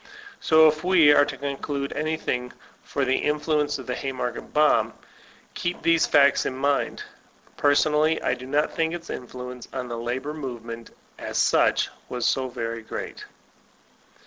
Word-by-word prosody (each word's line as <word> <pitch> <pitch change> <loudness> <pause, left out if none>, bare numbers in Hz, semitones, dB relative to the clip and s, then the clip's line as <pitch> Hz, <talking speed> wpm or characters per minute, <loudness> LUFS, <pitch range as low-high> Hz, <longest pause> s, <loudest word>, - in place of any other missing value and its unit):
So 160 0 +6
if 155 +1 0
we 175 -5 +6
are 145 - +5
to 145 -2 -6
conclude 140 0 -3
anything 150 -5 -2 0.3
for 140 -1 -2
the 130 +1 +2
influence 150 0 0
of 130 - -9
the 125 - -3
Haymarket 130 -2 -4
bomb, 150 0 +3 0.6
keep 175 0 -3
these 165 0 +3
facts 140 -1 +4
in 130 - -3
mind. 140 +1 0 0.5
Personally 150 +2 +3
I - - 0
do 130 0 -7
not 145 +3 0
think 165 +1 0
its 170 -1 -8
influence 125 0 -7
on 125 -2 -5
the 120 - -4
labor 130 +5 -3
movement, 120 -5 -7 0.3
as - - -4
such, - - +3 0.2
was 125 -1 -3
so 130 -1 +1
very 115 -2 -4
great. 110 - -7
140 Hz, 150 wpm, -25 LUFS, 125-150 Hz, 0.6 s, So